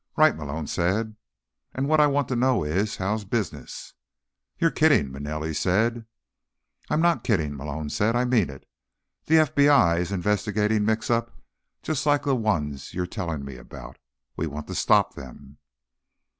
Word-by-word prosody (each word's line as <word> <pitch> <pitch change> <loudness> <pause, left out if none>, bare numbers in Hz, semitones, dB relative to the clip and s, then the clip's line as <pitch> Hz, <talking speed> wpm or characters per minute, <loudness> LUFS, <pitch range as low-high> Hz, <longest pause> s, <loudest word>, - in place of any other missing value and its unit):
"Right," 155 0 +5
Malone 75 +1 -5
said. 105 +8 -1 0.6
"And 135 +1 -1
what 155 +1 +3
I 150 - +6
want 140 -2 0
to 130 - -1
know 125 -4 +2
is: 95 +8 -1
how's 105 +3 -2
business?" 105 +1 -5 0.6
"You're 165 -1 +2
kidding?" 145 - +3
Manelli 75 +3 -4
said. 110 +8 0 0.8
"I'm 155 - +1
not 170 -1 +2
kidding," 80 - 0
Malone 75 +2 -5
said. 110 +3 +1
"I 125 +1 +2
mean 120 - +2
it. 70 -1 -12 0.6
The 160 - +4
FBI's 140 - +3
investigating 105 +2 0
mix 110 +1 0
ups 115 0 0 0.5
just 155 -1 -2
like 145 -1 +3
the 140 -2 +1
ones 75 - -2
you're 90 0 -1
telling 85 -7 -4
me 70 -2 -8
about. - - -11 0.4
We 80 - -2
want 75 0 -6
to - - -4
stop - - +3
them." 70 +1 -12
105 Hz, 155 wpm, -25 LUFS, 80-125 Hz, 0.8 s, I